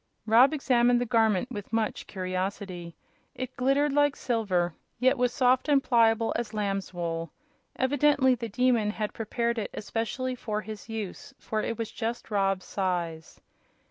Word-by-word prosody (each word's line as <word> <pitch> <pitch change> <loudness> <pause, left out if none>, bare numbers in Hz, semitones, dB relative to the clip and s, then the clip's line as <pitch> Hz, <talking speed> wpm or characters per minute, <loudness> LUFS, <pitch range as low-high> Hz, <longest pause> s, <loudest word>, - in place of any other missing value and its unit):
Rob 235 +5 +6
examined 245 -5 +3
the 245 - 0
garment 225 -1 +2
with 205 -4 -7
much 225 -1 -1
curiosity. 185 -2 -4 0.4
It 255 0 -5
glittered 275 +2 +2
like 290 0 +3
silver, 190 -8 0 0.2
yet 260 +2 +3
was 250 0 +1
soft 255 +1 +2
and 280 -2 +4
pliable 230 -2 +3
as 230 -2 -3
lamb's 195 -2 -2
wool. 165 -2 -3 0.4
Evidently 275 0 +3
the 235 -2 -4
Demon 240 -1 +2
had 210 0 -3
prepared 235 +1 -1
it 205 - -3
especially 230 +4 -3
for 215 -4 -3
his 215 +1 -9
use, 225 +6 -6
for 215 -1 -3
it 230 - -3
was 225 -1 -4
just 230 0 -4
Rob's 195 -2 +1
size. 175 -4 -3
225 Hz, 150 wpm, -28 LUFS, 200-250 Hz, 0.4 s, Rob